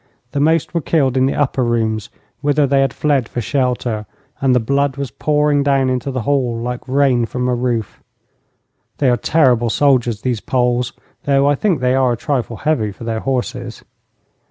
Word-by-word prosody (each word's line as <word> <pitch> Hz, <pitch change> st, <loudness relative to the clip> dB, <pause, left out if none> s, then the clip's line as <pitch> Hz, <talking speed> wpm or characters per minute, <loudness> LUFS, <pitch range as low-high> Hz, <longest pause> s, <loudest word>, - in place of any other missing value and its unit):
The 145 Hz, -, -2 dB
most 160 Hz, +2 st, +1 dB
were 170 Hz, -, 0 dB
killed 140 Hz, -5 st, +1 dB
in 130 Hz, 0 st, +3 dB
the -, -, -1 dB
upper 135 Hz, -2 st, 0 dB
rooms, 110 Hz, -3 st, -1 dB, 0.3 s
whither 145 Hz, 0 st, +2 dB
they 135 Hz, 0 st, +2 dB
had 135 Hz, -2 st, +1 dB
fled 140 Hz, -5 st, 0 dB
for -, -, -4 dB
shelter, 120 Hz, -4 st, -1 dB, 0.3 s
and 130 Hz, -2 st, +3 dB
the -, -, +4 dB
blood 140 Hz, +3 st, 0 dB
was 140 Hz, -4 st, -4 dB
pouring 150 Hz, -1 st, +1 dB
down 135 Hz, -2 st, +2 dB
into 130 Hz, +1 st, -2 dB
the 130 Hz, -2 st, -2 dB
hall 130 Hz, -3 st, 0 dB
like 125 Hz, +2 st, -5 dB
rain 130 Hz, -3 st, +2 dB
from 125 Hz, +2 st, -2 dB
a 125 Hz, -, +1 dB
roof. 120 Hz, -3 st, -2 dB, 1.0 s
They 135 Hz, -3 st, +2 dB
are -, -, +3 dB
terrible 120 Hz, -2 st, +2 dB
soldiers, 120 Hz, -5 st, +1 dB
these 125 Hz, -4 st, -1 dB
Poles, 125 Hz, -1 st, 0 dB, 0.3 s
though 140 Hz, -1 st, +3 dB
I 145 Hz, -, +4 dB
think 165 Hz, -1 st, 0 dB
they 125 Hz, 0 st, +2 dB
are 130 Hz, -2 st, +2 dB
a -, -, -4 dB
trifle 120 Hz, -4 st, -2 dB
heavy 120 Hz, -6 st, 0 dB
for 105 Hz, -, -12 dB
their 115 Hz, -1 st, -2 dB
horses. 125 Hz, -2 st, -3 dB
130 Hz, 185 wpm, -18 LUFS, 120-140 Hz, 1.0 s, the